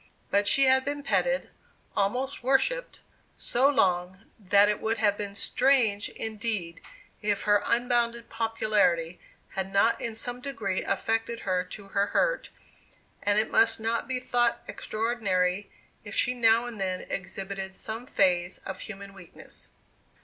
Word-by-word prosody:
But 205 0 +3
she 275 - +6
had 265 0 +4
been 285 +1 -3
petted, - - 0 0.4
almost 250 +8 -1
worshipped, 275 - +1 0.4
so 260 +3 +2
long, 185 -8 +1 0.2
that 200 0 +4
it 210 - -1
would 225 +1 0
have 210 -2 +2
been 200 -1 -6
strange 230 -2 +2
indeed 210 -6 -4 0.4
if 205 -1 0
her 205 -1 +3
unbounded 235 -1 +1
popularity 210 -7 0 0.3
had 190 0 -4
not 200 +4 +3
in 230 -1 -4
some 245 +2 -3
degree 220 -9 -2
affected 225 +1 -1
her 185 -1 0
to 195 +2 -11
her 200 +1 +1
hurt, - - 0 0.7
and 205 0 +1
it 215 - +1
must 225 0 +4
not 225 +1 -1
be 260 -1 -1
thought 240 -1 0
extraordinary 200 -4 -1 0.3
if 205 0 -7
she 250 - +3
now 230 -1 +4
and 230 -4 -7
then 185 -1 -2
exhibited 190 +1 -5
some 225 +5 -5
phase 180 -4 +1
of 190 -1 -5
human 200 -2 -8
weakness. 180 -4 -12
215 Hz, 140 wpm, -27 LUFS, 195-240 Hz, 0.7 s, she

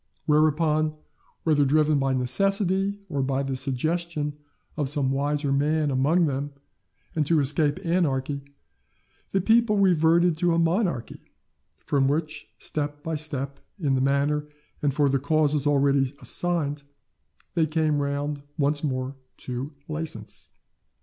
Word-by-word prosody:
Whereupon, 155 0 +2 0.5
whether 150 -3 +3
driven 150 +1 +3
by 135 -1 +1
necessity, 195 +9 +1
or 145 -6 -3
on 135 +1 0
the 135 -1 -2
suggestion 150 +3 -2 0.4
of 145 -3 -1
some 140 -2 +1
wiser 145 +1 0
man 150 +2 +1
among 150 +7 +3
them 140 0 -2 0.6
and 155 - +2
to 165 -1 +4
escape 150 +5 0
anarchy, 145 -5 0 0.9
the 195 - +1
people 225 +1 +3
reverted 170 -2 +4
to 175 -1 +2
a - - +1
monarchy, 170 - 0 0.6
from 135 -2 +2
which, 155 +1 -2
step 145 -1 -4
by 160 - -3
step, 140 -3 -4 0.2
in 145 -6 +1
the 130 - +2
manner 140 +2 +1 0.3
and 145 - +2
for 145 +1 +2
the 135 0 +2
causes 150 0 +1
already 140 -2 +3
assigned, 155 -5 -1 0.7
they 160 -2 +2
came 155 -1 +1
round 140 +1 -2 0.2
once 145 +1 +1
more 130 -1 -2 0.2
to 130 +3 -5 0.2
license. 150 -10 -5
150 Hz, 130 wpm, -25 LUFS, 140-160 Hz, 0.9 s, to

